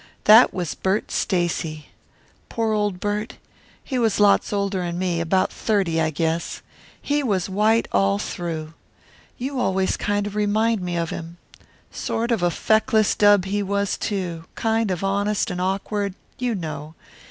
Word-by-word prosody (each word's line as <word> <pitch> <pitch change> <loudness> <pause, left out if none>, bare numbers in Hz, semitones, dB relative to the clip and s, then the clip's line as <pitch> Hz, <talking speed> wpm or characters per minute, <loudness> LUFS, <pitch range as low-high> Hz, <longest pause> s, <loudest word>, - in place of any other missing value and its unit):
That 220 +4 +8
was 175 -4 -3
Bert 190 +3 -1
Stacy. 165 -4 -1 0.6
Poor 225 -1 0
old 205 -3 0
Bert! 210 +2 -3 0.5
He 260 -3 -2
was 225 -4 +1
lots 205 -1 +4
older 200 -1 -1
than 175 -1 -3
me; 175 -2 -1
about 185 +3 +1
thirty, 190 -7 0
I 160 - +2
guess. 160 +2 -2 0.4
He 290 +1 0
was 200 -9 0
white 215 +4 +2
all 100 0 +2
through. 160 - -5 0.6
You 265 +1 -3
always 190 -5 +1
kind 205 0 -1
of 205 - -5
remind 215 +1 +1
me 175 -1 -3
of 165 -1 -2
him. 170 +1 -7 0.5
Sort 235 +2 -2
of 225 -5 +1
a 175 - +3
feckless 220 +3 +2
dub 205 -2 +5
he 205 +2 -1
was, 200 0 -1
too; 180 -6 -3
kind 225 -1 0
of 185 0 -2
honest 200 +1 0
and 180 0 -3
awkward 195 +1 -2 0.2
you 245 -2 0
know. 155 -3 -6
195 Hz, 155 wpm, -23 LUFS, 175-215 Hz, 0.6 s, That